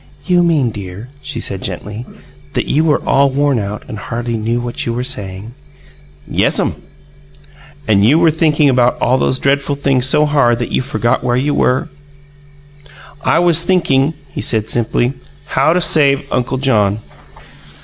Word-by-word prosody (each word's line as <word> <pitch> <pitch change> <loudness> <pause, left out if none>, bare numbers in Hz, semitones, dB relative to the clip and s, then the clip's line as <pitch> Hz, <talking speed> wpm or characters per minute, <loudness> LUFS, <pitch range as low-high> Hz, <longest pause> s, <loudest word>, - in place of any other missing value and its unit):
"You 180 -1 +3
mean, 155 -8 +2
dear," 100 +3 -8
she - - -5
said 95 -1 -3
gently, 105 +5 -6 0.5
"that - - -1
you 155 - +2
were 155 -2 +1
all 140 0 +3
worn 140 -1 +1
out 105 +1 -5
and 110 -5 -7
hardly 120 +2 -4
knew 115 +2 -1
what 120 0 -4
you 115 - -2
were 125 - -2
saying?" 105 -3 -4 0.7
"Yes'm." - - 0 1.1
"And 100 -2 +3
you 130 +9 +5
were 165 -1 +4
thinking 155 -1 +2
about 125 -2 +2
all 130 +2 +2
those 130 - +1
dreadful 140 +1 0
things 135 -2 0
so 150 +2 +3
hard 140 -6 +2
that 120 - -4
you - - +1
forgot 120 -3 -1
where 120 -1 +1
you 145 +3 0
were?" 130 +5 +1 1.4
"I - - +2
was 170 -2 +4
thinking," 160 -5 +1 0.2
he - - -5
said 110 -1 0
simply, 120 +2 +1 0.3
"how 155 - +1
to 180 - +2
save 145 -5 +3
Uncle 125 +1 -1
John." 105 -7 +1
130 Hz, 160 wpm, -15 LUFS, 115-145 Hz, 1.4 s, you